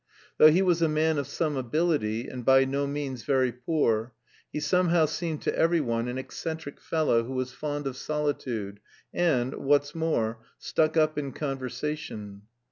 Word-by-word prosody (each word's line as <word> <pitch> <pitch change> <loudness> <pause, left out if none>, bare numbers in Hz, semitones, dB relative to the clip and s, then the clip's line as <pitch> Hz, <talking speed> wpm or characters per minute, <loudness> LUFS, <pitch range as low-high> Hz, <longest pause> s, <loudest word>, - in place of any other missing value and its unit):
Though 155 - +10
he 175 +5 +4
was 175 -2 +2
a 165 - +3
man 155 0 +2
of 140 - -3
some 155 -3 -1
ability, 130 -4 0
and 125 -1 -6
by 135 +2 +6
no 140 +1 -1
means 140 -3 -4
very 130 -1 +2
poor, 120 -3 0 0.4
he - - -3
somehow 170 +2 +3
seemed 155 0 -3
to - - 0
every 165 +1 +3
one 115 -4 -1
an 125 +1 -3
eccentric 145 +3 -6
fellow 155 -8 +1
who 125 +3 -6
was 130 0 -3
fond 145 -1 -4
of 135 -2 -3
solitude, 130 -9 -3 0.3
and, 130 -8 +1
what's 145 +1 +1
more, 120 -9 -1 0.2
"stuck 160 +1 0
up 155 -1 +3
in 140 -2 -4
conversation." 130 -7 -4
145 Hz, 165 wpm, -27 LUFS, 125-155 Hz, 0.4 s, Though